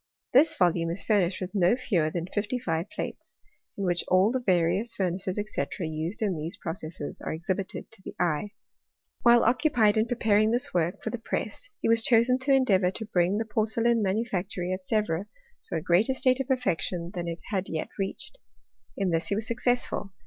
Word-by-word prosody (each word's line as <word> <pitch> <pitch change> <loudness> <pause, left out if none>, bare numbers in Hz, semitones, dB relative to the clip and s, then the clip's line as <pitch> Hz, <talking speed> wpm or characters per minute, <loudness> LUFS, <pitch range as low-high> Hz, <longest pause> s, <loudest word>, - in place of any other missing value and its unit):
This 280 +6 +5
volume 170 -2 +2
is 170 +4 -2
furnished 195 -4 +1
with 185 +1 -5
no 190 +1 +4
fewer 175 -11 0
than 170 +1 -3
fifty 205 +6 -2
five 165 -5 -2
plates, - - -7 0.4
in 200 - -3
which 175 -2 +1
all 185 +4 +4
the 260 - 0
various 190 +1 +1
furnaces, 185 0 -1
&c. 215 - -2 0.2
used 160 +6 -3
in 195 -4 0
these 155 +2 -4
processes 160 -3 -6
are - - -4
exhibited 185 +4 -4
to 225 -3 -13
the - - -9
eye. 175 +2 0 0.7
While 235 0 +6
occupied 230 -4 +3
in 220 +1 +2
preparing 220 -3 +2
this 240 +2 0
work 175 0 0
for - - -2
the 240 - -4
press - - -4
he - - 0
was 230 0 +4
chosen 235 +2 +4
to 270 +2 0
endeavour 205 -9 +4
to 220 +4 -5
bring 185 -1 +1
the 225 - -1
porcelain 225 +2 +1
ma 195 - +1
nufactory 190 -3 -2
at 185 0 -5
Sevre 205 -3 0 0.4
to - - -5
a 160 - -1
greater 185 - +2
state 255 0 +2
of 270 - -2
perfection 180 - -1
than 175 -1 -4
it 170 -1 -5
had 195 -2 -1
yet 160 -1 -3
reached. 195 - -4 0.6
In 190 -2 0
this 165 0 0
he 200 - 0
was 215 +1 -1
successful. 245 -4 -1
195 Hz, 190 wpm, -27 LUFS, 175-230 Hz, 0.7 s, While